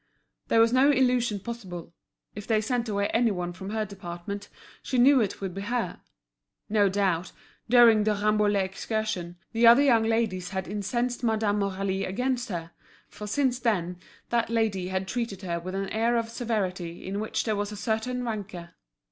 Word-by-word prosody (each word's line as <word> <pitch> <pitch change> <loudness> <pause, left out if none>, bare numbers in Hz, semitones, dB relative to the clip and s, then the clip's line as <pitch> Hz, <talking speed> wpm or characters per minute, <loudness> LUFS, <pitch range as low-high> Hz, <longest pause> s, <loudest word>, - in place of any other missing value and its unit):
There 225 - +3
was 230 +1 +5
no 265 +3 +5
illusion 250 -6 +2
possible; 185 -8 -7 0.4
if 205 0 -8
they 220 -2 +3
sent 235 +2 -1
away 200 -1 0
any 230 0 +3
one 180 -3 -3
from 190 +2 -8
her 215 0 -1
department 195 0 -7 0.3
she 260 - -2
knew 260 +1 +6
it 205 - -2
would 190 -2 -3
be 195 - -5
her. 235 +3 -2 0.7
No 205 -2 +3
doubt, 185 -3 0 0.4
during 235 -3 +7
the 210 0 +1
Rambouillet 210 -1 +2
excursion, 190 -3 -3
the 230 0 +4
other 240 +5 +8
young 240 -5 +5
ladies 220 -5 0
had 190 -1 -4
incensed 235 +5 -2
Madame 215 -2 +1
Aurélie 195 -1 -1
against 245 +5 -1
her, 170 -3 -5 0.4
for 210 - -8
since 250 +3 +1
then 180 -7 -1 0.3
that 235 -1 +1
lady 220 -5 0
had 190 0 -2
treated 210 -3 -3
her 170 -2 -2
with 185 +2 -6
an 195 0 -2
air 230 +2 +1
of 230 -1 -1
severity 190 -8 -3
in 195 +2 -3
which 215 - -2
there 215 -2 0
was 205 0 -2
a 210 - -7
certain 245 +4 -2
rancour. 195 -6 -5
210 Hz, 175 wpm, -27 LUFS, 190-235 Hz, 0.7 s, other